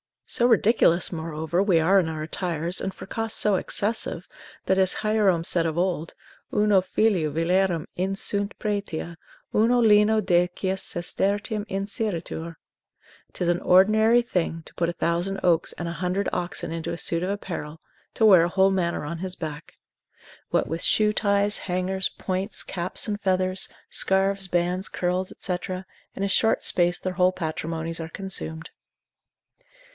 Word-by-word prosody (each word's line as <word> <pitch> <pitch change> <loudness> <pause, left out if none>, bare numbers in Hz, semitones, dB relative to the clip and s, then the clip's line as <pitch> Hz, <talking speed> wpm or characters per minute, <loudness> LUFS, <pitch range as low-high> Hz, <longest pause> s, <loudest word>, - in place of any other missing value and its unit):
So 240 - +2
ridiculous, 220 -6 +3
moreover, 160 +1 -2
we 190 -5 +3
are 190 +5 +4
in 175 - 0
our 155 -1 -4
attires, 170 +1 -1
and 195 - -2
for - - -10
cost 225 +3 -3
so 210 -2 +3
excessive, 205 -3 -1 0.4
that 190 - +2
as 190 -1 +3
Hierome 210 -6 +2
said 170 -1 +1
of 160 0 -2
old, 175 -3 -1 0.4
Uno 210 -2 +4
filio 185 -4 +1
villarum 170 +1 +1
insunt 195 +2 -1
pretia, 200 -6 -4 0.4
uno 235 +3 +3
lino 215 -1 +4
decies 185 +1 0
sestertium 205 +4 0
inseritur; 195 -5 -4 0.8
'tis 180 - -2
an 175 0 +1
ordinary 215 +6 +4
thing 165 -7 -2
to - - -13
put 170 - -1
a - - -3
thousand 175 +3 -1
oaks 170 -2 +2
and 175 - -6
a 170 - -7
hundred 185 +2 -1
oxen 175 -2 -3
into 165 0 -4
a - - -5
suit 170 -1 0
of 185 - -2
apparel, 165 -6 -5 0.4
to 220 - +3
wear 185 -6 +7
a - - -1
whole 190 +1 +3
manor 180 -3 -1
on 165 +3 -5
his 185 0 -4
back. 155 -1 -7 0.7
What - - +1
with 165 +2 -4
shoe 210 -1 +2
ties, 205 0 +1
hangers, 185 +1 0
points, 190 +2 -3
caps 180 +3 -1
and 205 -1 -2
feathers, 185 -1 0 0.2
scarves, 195 0 +1
bands, 180 +1 0
curls, 180 +1 -2
&c., 180 -2 -2 0.6
in 195 - -3
a - - +1
short 225 +3 +2
space 175 0 +3
their 185 - -4
whole 180 0 +3
patrimonies 165 -1 -4
are 160 0 -5
consumed. 165 -3 -5
185 Hz, 155 wpm, -25 LUFS, 170-200 Hz, 0.8 s, wear